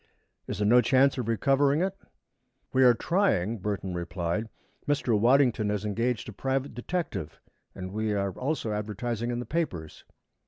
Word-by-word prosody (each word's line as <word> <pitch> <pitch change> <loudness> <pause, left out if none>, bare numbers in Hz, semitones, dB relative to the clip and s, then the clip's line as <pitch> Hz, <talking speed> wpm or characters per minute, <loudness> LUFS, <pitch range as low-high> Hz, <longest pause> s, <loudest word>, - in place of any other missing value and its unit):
Is - - -4
there 105 - 0
no 120 +3 +6
chance 130 +3 +3
of 120 - -3
recovering 140 +5 +2
it? 190 0 -1 0.8
"We 130 - +5
are 125 -2 +7
trying," 115 - +1
Burton 95 -1 -3
replied. 85 +4 -3 0.4
"Mr. 140 -5 +1
Waddington 120 -1 +3
has 105 0 -2
engaged 115 +2 -1
a 110 - -7
private 135 +5 -2
detective 120 - -4 0.4
and 95 -1 -6
we 110 0 -1
are 100 -1 0
also 130 - -2
advertising 110 +3 -3
in 120 - -1
the 120 - -4
papers." 90 - -3
115 Hz, 155 wpm, -28 LUFS, 105-135 Hz, 0.8 s, are